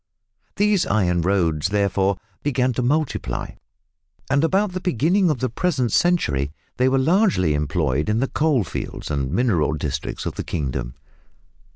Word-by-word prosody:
These 205 -2 +2
iron 90 -4 +1
roads, 85 -3 +1
therefore, 100 -1 +1 0.2
began 130 -3 +1
to 125 - -1
multiply, 145 +4 -1 0.8
and 140 +2 +3
about 190 +4 +2
the 185 - -3
beginning 180 - +2
of 145 -6 -1
the 130 - +1
present 130 - 0
century 75 - +1 0.3
they 130 +1 +3
were 135 - +2
largely 160 - +2
employed 75 +1 0
in 105 - +1
the 135 - +1
coal 140 -3 +1
fields 75 - -6
and 70 -2 -1
mineral 90 -7 +1
districts 75 -1 -4
of - - -2
the - - -5
kingdom. 65 -5 -3
110 Hz, 150 wpm, -22 LUFS, -, 0.8 s, and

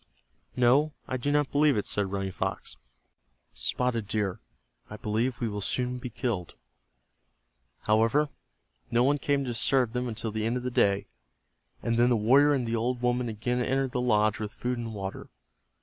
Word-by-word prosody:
"No, 135 +5 +4
I 130 - -2
do 145 +4 -1
not 145 -1 +1
believe 145 -3 +3
it," 105 - -1
said 100 -2 -1
Running 95 -1 -2
Fox. - - -4 0.8
"Spotted 110 - -1
Deer, 105 -3 -1 0.5
I 105 - -7
believe 115 +4 -1
we 120 - -1
will 105 -1 -4
soon 125 +4 -1
be 125 - -6
killed." 110 - -3 1.3
However, 115 +8 +3 0.6
no 120 0 +3
one 145 +2 +2
came 140 -1 +1
to 125 - -3
disturb 120 0 +2
them 125 0 -1
until 110 -1 -4
the 110 0 -2
end 120 +2 0
of 125 - -5
the 125 - -2
day, 100 -4 +2 0.8
and 115 0 0
then 120 +1 +5
the 120 - +3
warrior 135 +7 +5
and 125 -4 -1
the 115 - 0
old 120 +2 -1
woman 125 0 +1
again 120 +3 -1
entered 135 +1 0
the 125 - -1
lodge 110 -3 +2
with 110 +2 -5
food 125 0 -2
and 115 -2 -5
water. 95 -1 -6
120 Hz, 180 wpm, -28 LUFS, 110-125 Hz, 1.3 s, then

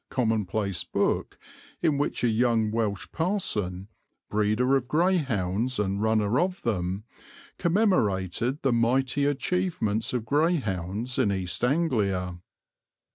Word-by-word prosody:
commonplace 110 - -1
book - - -1 0.5
in 155 -4 +3
which 145 -2 -1
a - - +4
young 115 -1 +2
Welsh 110 -4 -1
parson, 105 - -1 0.4
breeder 110 +5 +2
of 130 -2 0
greyhounds 130 - +1
and 100 -1 -1
runner 110 +1 +2
of 185 +1 -1
them, 95 -3 -1 0.6
commemorated 125 - +1
the 135 -3 +3
mighty 130 +4 +2
achievements 145 - 0
of 120 -3 -2
greyhounds 120 - 0
in 110 -6 +3
East 95 0 -3
Anglia. 105 - 0
115 Hz, 110 wpm, -27 LUFS, 100-140 Hz, 0.6 s, a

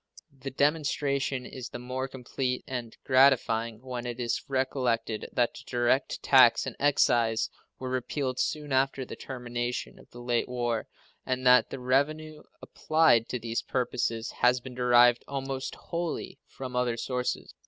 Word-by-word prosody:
The 135 0 -6
demonstration 140 -2 0
is 125 -1 -7
the - - -7
more 130 +2 -4
complete 125 0 -3
and 120 -3 -5
gratifying 120 -4 +3
when 125 -2 -5
it 120 0 -5
is 120 -1 -1
recollected 125 -5 -1
that 120 -1 +1
the - - -11
direct 120 +2 0
tax - - +6
and - - -5
excise 120 -5 +2 0.3
were 130 - -6
repealed 130 +1 -2
soon 150 -2 -2
after 135 0 +1
the - - -8
termination 120 -1 -5
of - - -18
the 120 - -12
late 120 -1 0
war, 120 -2 -2 0.4
and 130 0 -2
that 125 0 +6
the 135 - -6
revenue 150 +4 0 0.2
applied 155 -8 +3
to 125 - -2
these 115 0 -3
purposes 120 -2 -2
has 125 +1 +3
been 125 +1 -10
derived 120 -1 +5
almost 135 -1 -4
wholly 170 -1 -4
from 130 -2 -8
other 125 -2 0
sources. 125 +1 -3
125 Hz, 150 wpm, -28 LUFS, 120-135 Hz, 0.4 s, tax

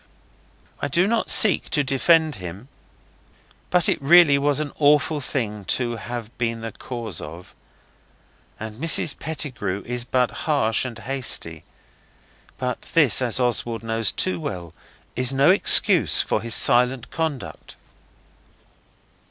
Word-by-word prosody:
I - - -2
do 170 +6 +2
not 225 +2 -1
seek 210 -4 +3
to 150 - 0
defend 155 +2 +2
him. 95 +7 -9 1.0
But 180 -2 +2
it - - 0
really 145 -1 +5
was 145 +1 0
an 155 -1 -4
awful 150 +1 +2
thing 105 -6 -4
to 120 -2 -3
have 120 0 -8
been 115 -1 -2
the 115 0 -6
cause 115 -9 -6
of; 80 +4 -11 1.1
and 110 +3 -8
Mrs 160 -3 0
Pettigrew 130 - -4
is 125 0 -3
but 125 0 0 0.2
harsh 115 -6 +1
and 120 -3 -7
hasty. 115 - -2 0.9
But 125 -1 -4
this, 145 -8 +4
as 125 -1 +1
Oswald 120 -2 -1
knows 115 -1 0
too 185 - -1
well, 90 - -7 0.4
is 125 +1 +2
no 135 +5 +4
excuse 195 - +4
for - - 0
his 115 -1 -1
silent 125 0 +2
conduct. 160 -6 -5
125 Hz, 130 wpm, -22 LUFS, 115-145 Hz, 1.1 s, really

